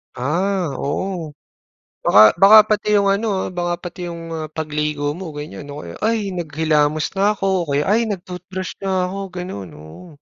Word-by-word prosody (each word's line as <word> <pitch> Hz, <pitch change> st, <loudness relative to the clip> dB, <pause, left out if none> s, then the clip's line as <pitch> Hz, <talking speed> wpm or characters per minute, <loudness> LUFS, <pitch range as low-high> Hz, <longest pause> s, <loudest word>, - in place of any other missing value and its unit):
Ah, 175 Hz, +6 st, -1 dB
oo. 165 Hz, +1 st, -3 dB, 0.7 s
Baka 105 Hz, +1 st, +7 dB
baka 200 Hz, +3 st, +9 dB
pati 210 Hz, 0 st, +2 dB
yung 200 Hz, -, +2 dB
ano, 215 Hz, +3 st, -1 dB, 0.2 s
ah, -, -, -4 dB
baka 175 Hz, -1 st, -1 dB
pati 175 Hz, 0 st, -6 dB
yung 165 Hz, -1 st, -7 dB
mga 160 Hz, -1 st, -4 dB
pagligo 150 Hz, -1 st, -2 dB
mo 180 Hz, +1 st, -7 dB
ganiyan 145 Hz, -1 st, -8 dB
o 145 Hz, -9 st, -7 dB
kaya, 85 Hz, -, -8 dB
“Ay, 215 Hz, -3 st, 0 dB
naghilamos 155 Hz, -2 st, 0 dB
na 200 Hz, +2 st, +2 dB
ako,” 195 Hz, -, -3 dB, 0.2 s
o -, -, -3 dB
kaya, 140 Hz, +1 st, +1 dB
“Ay, 220 Hz, +3 st, +2 dB
nag-toothbrush 185 Hz, -1 st, -6 dB
na 190 Hz, -2 st, 0 dB
ako.” 190 Hz, +2 st, -5 dB, 0.2 s
Ganun, 100 Hz, -, -6 dB
oo. 80 Hz, -, -12 dB
175 Hz, 170 wpm, -20 LUFS, 150-195 Hz, 0.7 s, baka